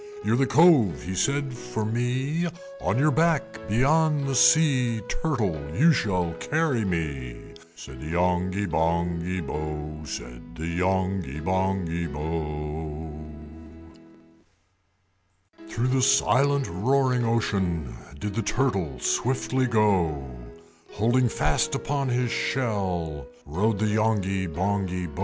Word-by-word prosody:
"You're - - +2
the 135 +2 +2
Cove," 135 - +5
he 95 - -4
said, 140 +8 0
"for 125 -3 -4
me; 130 +9 -1 0.3
On - - 0
your 150 +3 +3
back 145 -8 +1
beyond 145 +5 +3
the 135 - -1
sea, 130 -6 +4
Turtle, 115 - -1 0.2
you 160 +5 +6
shall 90 - 0
carry 125 - 0
me!" 75 -10 -3 0.4
Said 65 -4 -11
the 75 - -6
Yonghy 90 +3 0
Bonghy 85 +1 -1
Bò, 75 0 -5
Said 60 +6 -8
the 80 - -7
Yonghy 90 -3 -1
Bonghy 90 -1 -1
Bò. 75 0 -4 2.5
IX. 110 0 -15
Through 120 +3 0
the 130 0 +2
silent 140 +1 +3
roaring 125 +6 +1
ocean 95 - -1 0.2
Did 105 0 -4
the 115 - -1
Turtle 100 - -1
swiftly 130 - 0
go; 95 - +1 0.7
Holding 120 +4 +2
fast 155 +5 0
upon 140 -1 -1
his 125 -1 0
shell 90 - -2 0.2
Rode 100 +9 0
the 110 - 0
Yonghy 105 -3 +1
Bonghy 90 +1 -1
Bò. 75 - -9
100 Hz, 115 wpm, -25 LUFS, 85-125 Hz, 2.5 s, you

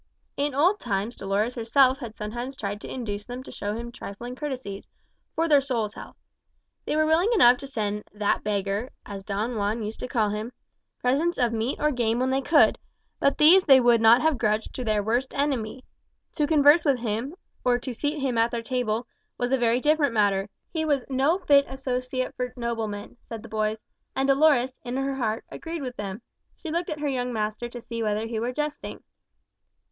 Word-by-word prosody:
In 285 -1 -1
old 360 +9 +3
times 210 +1 -2
Dolores 200 +5 -1
herself 260 +3 +3
had 235 -5 -7
sometimes 240 +5 -5
tried 205 0 -4
to - - -8
induce 210 -5 -5
them 245 +1 -6
to - - -11
show 205 +1 -4
him 235 +1 -5
some - - -12
trifling 240 +1 -8
courtesies, 255 -9 -6 0.5
"for 330 +1 +1
their 290 -3 +5
soul's 235 -6 -2
health." - - -10 0.7
They - - 0
were 310 0 +3
willing 325 +6 +3
enough 250 - +6
to 275 - -8
send 210 -5 -3
"that 210 -1 0
beggar" 205 +3 -1 0.2
as 200 -1 -7
Don 215 +4 -2
Juan 210 +2 -1
used 215 +1 -5
to - - -4
call 225 -5 +1
him 215 +4 -4 0.4
presents 295 +8 +1
of 240 -3 +1
meat 230 +4 -1
or 300 0 +2
game 235 -3 0
when 255 +1 +1
they 265 +1 +1
could, 295 +2 +4 0.4
but 280 - +2
these 355 +5 +7
they 270 -3 +8
would 240 -2 +4
not 230 +4 +6
have 315 -5 +2
grudged 215 +1 0
to 255 - -4
their 215 -3 +1
worst 240 +5 -1
enemy. 260 -4 -1 0.5
To 300 -2 0
converse 300 +1 +6
with 280 -4 +3
him, 235 +6 -3 0.3
or 245 -1 +3
to 245 +1 -6
seat 295 +5 -2
him 255 -4 0
at 230 +1 +3
their 235 -1 -4
table, 240 -1 -1 0.3
was 245 +1 -1
a 265 - +4
very 235 0 +3
different 295 -2 +2
matter. 200 -1 +2 0.2
He 320 -2 0
was 290 -4 +1
"no 275 +7 +2
fit 285 -7 +5
associate 255 -1 -3
for 250 0 -3
noblemen," 225 -2 -4
said 225 -2 -6
the 230 - -11
boys; 215 0 -1 0.4
and 270 0 +1
Dolores, 275 -2 +4
in 245 +1 -4
her 270 0 -1
heart, 225 -4 -2
agreed 330 -2 -6
with 250 -1 -5
them. 205 +1 -6 0.3
She 325 - -7
looked 340 +2 -1
at 305 -1 -4
her 295 - 0
young 250 -2 -1
master 215 +1 -3
to 240 - -8
see 230 0 -5
whether 215 0 0
he 225 -1 -3
were 240 +2 -1
jesting. 300 +2 -4
245 Hz, 205 wpm, -26 LUFS, 220-275 Hz, 0.7 s, they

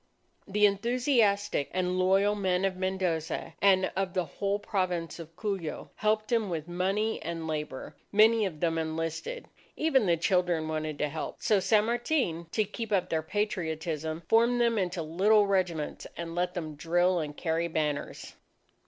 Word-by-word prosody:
The 210 +1 +3
enthusiastic 205 - +2
and 185 0 0
loyal 195 +3 +3
men 190 -2 0
of 190 -1 0
Mendoza 185 -4 -2
and 190 -1 +4
of 190 0 -2
the 180 -2 +1
whole 200 +6 -2
Province 180 -5 -2
of 165 0 -10
Cuyo, 195 -5 -4
helped 215 +2 0
him 225 -4 +2
with 160 -2 -3
money 195 +5 -1
and 165 -1 -4
labour. 150 -4 -5 0.2
Many 215 +1 +5
of 155 -5 -9
them 165 -1 +1
enlisted. 165 - -4 0.3
Even 270 -9 +3
the 170 -1 +3
children 175 -2 +1
wanted 155 -1 -3
to 150 - 0
help; 155 +2 -5
so 215 -3 +3
San 210 +3 +3
Martin, 235 - 0
to 215 - +2
keep 215 +2 -6
up 190 -3 +1
their 160 -1 0
Patriotism, 160 -4 -2
formed 235 +2 +4
them 235 -2 +2
into 180 -2 -2
little 200 +7 +4
regiments 180 -6 -1
and 170 -1 -5
let 180 +1 -1
them 160 -3 -4
drill 175 +4 +1
and 150 -2 -5
carry 165 0 0
banners. 150 -3 -3
185 Hz, 160 wpm, -29 LUFS, 165-210 Hz, 0.3 s, Many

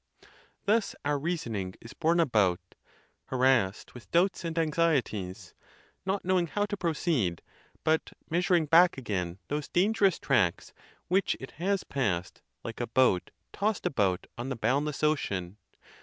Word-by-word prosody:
Thus 215 +1 +2
our 145 0 +1
reason 155 -7 -2
ing 95 -2 -4
is 115 - -11
borne 170 +1 +2
about, 105 - +3 0.7
harassed 130 -7 +1
with 125 - -12
doubts 180 +2 +2
and 165 -1 -4
anxieties, 150 - 0 0.5
not 195 0 -1
knowing 180 -2 +2
how 205 +5 0
to: 205 - -3
proceed, 155 - 0 0.4
but 160 0 +1 0.2
measuring 175 0 +2
back 170 +2 +5
again 95 -8 -3
those 145 0 -3
dangerous 195 0 +2
tracts 105 -11 +1 0.3
which 190 +2 +1
it 130 - -8
has 195 +1 +1
passed, 95 -10 -2 0.2
like - - -6
a - - -2
boat 125 -9 +2 0.2
tossed 210 0 -1
about 95 -8 +1
on 125 +3 -3
the 135 - -2
boundless 145 +6 0
ocean. 100 - 0
150 Hz, 140 wpm, -29 LUFS, 105-175 Hz, 0.7 s, back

